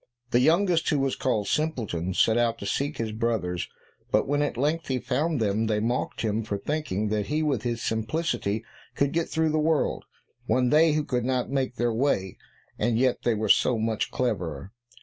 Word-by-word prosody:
The 120 - +4
youngest, 170 +4 +3
who 150 - +2
was 135 -1 0
called 110 -6 0
Simpleton, 105 - -1
set 110 - +4
out 120 -1 +1
to - - -7
seek 140 +9 -1
his 110 -1 -2
brothers, 110 -6 -2 0.4
but - - +2
when 145 +1 +1
at 145 - -1
length 155 +5 0
he 130 - 0
found 140 +5 -1
them 110 +1 +1
they 105 -1 +1
mocked 120 +3 -1
him 110 0 0
for 105 -2 -3
thinking 110 -5 -2
that 105 -1 -1
he 155 +2 0
with 140 -8 0
his 120 0 -3
simplicity 110 -2 -1 0.3
could 140 0 +1
get 165 0 -1
through 160 0 +1
the 155 0 +1
world, 155 -1 +1 0.4
when 125 -1 +2
they 155 +1 +5
two 155 - +1
could 125 -4 -1
not 130 0 -1
make 135 -2 -1
their 120 -1 0
way, 110 -7 0 0.4
and 115 +1 +1
yet 130 0 +2
were 110 -2 0
so 115 +3 +4
much 110 0 -1
cleverer. 95 - -2
120 Hz, 190 wpm, -26 LUFS, 110-145 Hz, 0.4 s, they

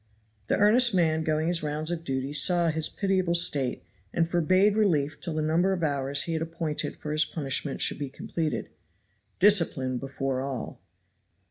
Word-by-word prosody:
The - - +1
earnest 225 +2 +4
man 160 -3 +2
going 155 0 0
his 175 -1 0
rounds 155 +2 -2
of 170 -1 -4
duty 135 -1 -3
saw 170 +4 +4
his 160 0 -2
pitiable 185 -3 0
state 145 -7 +1 0.3
and 165 -1 +1
forbade 185 +4 +2
relief 155 -9 +1
till 170 -3 -4
the 155 - -1
number 170 +5 +2
of 175 -3 -3
hours 140 -2 +1
he 165 - -3
had 160 - -2
appointed 165 -2 -3
for 150 - -6
his 155 0 +3
punishment 140 -2 -3
should - - +1
be 140 -2 -4
completed. 155 0 -4 0.7
Discipline 160 -11 +2
before 135 -1 -3
all! 135 -3 -6
160 Hz, 165 wpm, -27 LUFS, 140-175 Hz, 0.7 s, earnest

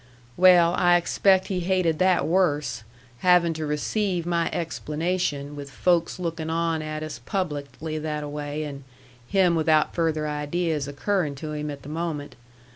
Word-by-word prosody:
"Well, 175 -2 +6
I 175 0 +5
expect 190 +2 +3
he 190 -2 -1
hated 180 -3 +1
that 185 -1 +3
worse, 155 -9 +1 0.4
having 180 -2 +4
to 155 -1 -4
receive 175 +4 -1
my 170 -1 0
explanation 155 -3 -2
with 140 -1 -7
folks 170 +5 +1
lookin' 165 -3 -4
on 165 -1 0
at 155 0 -4
us 150 -6 -6
publicly 155 -2 -3
that 150 -1 -3
a - - -5
way, 145 +1 -4
and 140 -2 -7 0.4
him 185 0 +3
without 155 -2 +2
further 160 -2 0
ideas 150 0 -1
occurrin' 150 +1 -1
to 150 +3 -6
him 150 0 -4
at 145 -1 -7
the 145 - -9
moment. 155 -2 -4
160 Hz, 155 wpm, -25 LUFS, 150-175 Hz, 0.4 s, Well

